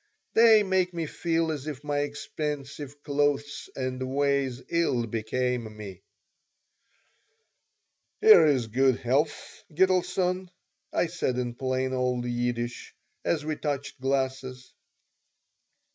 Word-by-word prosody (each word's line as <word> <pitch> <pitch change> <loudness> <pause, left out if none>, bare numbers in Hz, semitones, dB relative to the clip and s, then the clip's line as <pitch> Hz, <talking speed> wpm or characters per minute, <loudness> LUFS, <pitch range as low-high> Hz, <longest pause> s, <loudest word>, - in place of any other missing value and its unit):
They 225 -2 +7
make 185 -2 +1
me 165 -1 -2
feel 165 +1 -1
as 150 -1 -5
if 145 -2 -6
my 145 -1 -1
expensive 145 -1 -5
clothes 145 0 -1
and 130 -1 -3
ways 135 -1 0
ill 165 -8 +1
became 115 0 -2
me 100 -4 -9 2.2
"Here 435 - +8
is 135 -5 +2
good 130 +3 +2
health, 145 +5 -1
Gitelson," 185 +1 +1 0.4
I - - +1
said 160 -7 -2
in 120 -1 -2
plain 130 +1 -1
old 125 -1 0
Yiddish, 120 0 -3 0.3
as 150 -3 0
we 155 0 -1
touched 145 -2 -4
glasses. 130 -1 -2
140 Hz, 110 wpm, -27 LUFS, 125-155 Hz, 2.2 s, Here